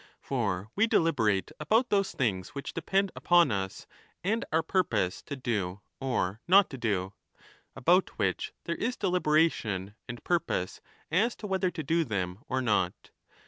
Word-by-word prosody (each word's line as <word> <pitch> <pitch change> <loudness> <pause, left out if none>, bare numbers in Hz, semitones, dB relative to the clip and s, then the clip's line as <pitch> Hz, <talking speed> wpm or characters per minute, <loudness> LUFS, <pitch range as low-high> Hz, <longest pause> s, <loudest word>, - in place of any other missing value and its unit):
For 105 -6 -2
we 220 +3 +4
deliberate 110 - +2
30 - - -16
about 220 +11 +2
those 195 -1 +2
things 100 -7 -1
which 140 - -5
depend 190 +4 0
upon 175 -6 +4
us 95 -2 -3 0.4
and 220 +5 0
our 160 +1 +2
purpose 110 - 0
to 140 - -6
do 105 -7 -2 0.2
or 120 -6 -1
not 195 +2 +6
to 135 - -6
do, 100 -4 -1 0.6
about 180 +6 +3
which - - -1
there 170 - -2
is 245 +7 -2
deliberation 150 - +1 0.2
and 120 0 -7
purpose 165 - -1 0.3
as 215 +8 +2
to - - -9
whether 190 -2 +1
to 170 -3 -5
do 165 +4 +2
them 95 - -3
or 130 0 0
not. 100 -6 0
140 Hz, 155 wpm, -29 LUFS, -, 0.6 s, not